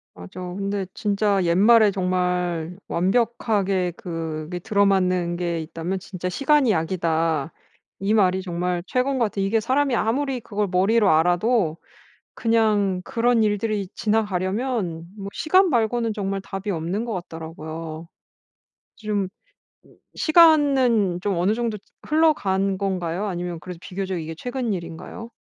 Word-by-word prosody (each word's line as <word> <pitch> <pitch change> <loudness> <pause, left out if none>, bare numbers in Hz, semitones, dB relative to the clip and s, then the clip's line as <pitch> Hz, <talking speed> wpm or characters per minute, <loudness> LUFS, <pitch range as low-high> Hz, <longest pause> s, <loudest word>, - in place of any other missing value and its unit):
맞아. 90 - -10
근데 195 +2 -3
진짜 205 -2 +1
옛말에 210 +6 +5
정말 180 -2 -1
완벽하게 195 -2 +1
그게 165 -3 -5
들어맞는 185 -4 +1
게 170 -2 -2
있다면 165 +4 -4
진짜 180 -1 -5
'시간이 275 +5 +3
약이다.' 165 -3 0 0.5
이 195 +2 0
말이 190 -3 +3
정말 175 -1 -2
최고인 255 +6 0
것 240 - +2
같아. 205 -1 -4
이게 195 +4 +2
사람이 260 +3 +1
아무리 260 +4 0
그걸 210 -2 -2
머리로 195 +4 +3
알아도 175 +2 +2 0.6
그냥 210 -5 +2
그런 230 +1 +2
일들이 205 -1 0
지나가려면 205 -3 -1
뭐 195 -1 -6
시간 370 +4 +3
말고는 230 -3 +1
정말 195 -1 -2
답이 195 +1 -6
없는 175 +5 -2
것 235 -1 -4
같더라고요. 160 -2 -7 0.9
좀 210 -3 -2 0.9
시간은 275 - +4
좀 200 -3 0
어느 190 +5 +2
정도 230 -2 -2 0.3
흘러간 200 -12 +2
건가요? 185 -1 -2
아니면 175 -3 -4
그래도 180 -1 -8
비교적 190 0 -4
이게 160 0 -5
최근 245 +1 -3
일인가요? 170 +6 -8
195 Hz, 290 characters per minute, -23 LUFS, 175-225 Hz, 0.9 s, 옛말에